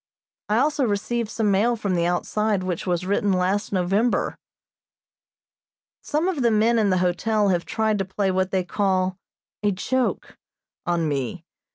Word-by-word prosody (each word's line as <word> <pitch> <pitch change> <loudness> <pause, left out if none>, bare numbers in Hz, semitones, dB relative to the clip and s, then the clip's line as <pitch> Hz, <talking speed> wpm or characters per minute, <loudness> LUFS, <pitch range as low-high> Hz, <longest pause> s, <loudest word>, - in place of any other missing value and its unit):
I 210 - +2
also 290 +2 +2
received 225 +1 -1
some 220 -2 0
mail 220 +5 +2
from 205 -4 -2
the 170 -1 +1
outside 205 +3 0
which 185 0 -3
was 180 0 0
written 200 +1 +1
last 190 +3 0
November. 195 +5 +1 1.7
Some 310 +4 -1
of 350 -7 -1
the 235 - +4
men 225 +2 +3
in 210 -2 +2
the 185 - +2
hotel 205 +4 +1
have 175 -2 0
tried 220 -2 0
to 195 - 0
play 190 +1 -1
what 185 0 0
they 190 -2 0
call 185 0 0 0.4
"a 205 - +2
joke" 255 +7 -2 0.5
on 170 -2 +1
me. 145 +3 -3
200 Hz, 160 wpm, -23 LUFS, 185-220 Hz, 1.7 s, the